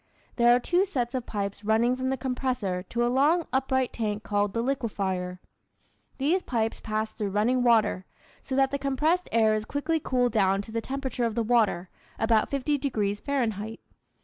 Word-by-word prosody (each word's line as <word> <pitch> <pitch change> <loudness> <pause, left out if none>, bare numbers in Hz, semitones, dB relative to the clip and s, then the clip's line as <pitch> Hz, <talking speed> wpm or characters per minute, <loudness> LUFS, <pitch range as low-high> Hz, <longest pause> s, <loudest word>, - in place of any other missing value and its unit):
There 240 0 +6
are - - +2
two 355 +9 +2
sets 250 -11 -2
of 255 -2 -3
pipes 200 0 -4
running 225 +4 +2
from 260 0 -2
the 265 - 0
compressor 250 -7 -2
to 240 0 0
a - - +2
long 295 +7 +3
upright 260 -1 +1
tank 210 -2 -2
called 205 -1 0
the 230 - -1
liquefier. 195 -9 -2 0.8
These 315 +8 +1
pipes 225 -6 -2
pass 215 0 -2
through 210 -2 -3
running 220 +6 +1
water, 225 -6 +3 0.3
so 265 - -4
that 270 0 +3
the 280 - -2
compressed 300 +6 0
air 220 -1 +4
is 215 0 -1
quickly 290 +7 -1
cooled 250 -4 +1
down 195 -2 +2
to 220 - -11
the 230 0 -2
temperature 265 -1 -3
of 225 -2 -2
the 235 - +1
water 215 -6 +2 0.3
(about 225 -1 +2
50 280 +1 0
degrees 210 -7 -1
Fahrenheit). 225 -6 -2
240 Hz, 180 wpm, -27 LUFS, 215-265 Hz, 0.8 s, There